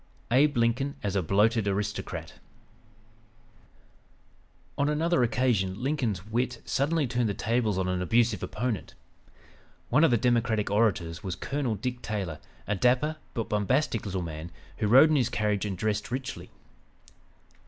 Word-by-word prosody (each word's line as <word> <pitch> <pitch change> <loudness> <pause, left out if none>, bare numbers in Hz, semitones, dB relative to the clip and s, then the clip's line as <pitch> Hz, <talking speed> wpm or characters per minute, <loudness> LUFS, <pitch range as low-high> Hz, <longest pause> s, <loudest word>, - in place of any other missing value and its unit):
ABE 140 +2 +4
LINCOLN 120 +4 +1
AS 100 -2 -1
A 95 - +2
"BLOATED 105 +5 +2
ARISTOCRAT" 100 +1 -3 2.4
On 140 +1 +1
another 160 0 +1
occasion 115 -6 +1
Lincoln's 120 - -1
wit 120 +2 -2
suddenly 150 +2 +1
turned 120 -2 0
the 100 - -2
tables 110 -3 0
on 95 -1 0
an 90 0 -1
abusive 115 +4 +2
opponent. 105 - -3 0.9
One 140 +7 +4
of - - +6
the 120 - +3
Democratic 115 -3 +1
orators 100 -6 +1
was 95 -3 -3
Colonel 130 +1 -2
Dick 125 +4 -4
Taylor, 95 -9 -4 0.3
a 105 - -1
dapper, 130 +9 +2 0.2
but 115 -2 -2
bombastic 115 +4 +1
little 95 -2 -2
man, 80 0 -6 0.3
who 110 - 0
rode 135 +8 +7
in - - +3
his 125 -4 +2
carriage, 105 -2 0
and 100 -3 -3
dressed 105 +2 -1
richly. 130 +2 -5
115 Hz, 145 wpm, -28 LUFS, 100-125 Hz, 2.4 s, rode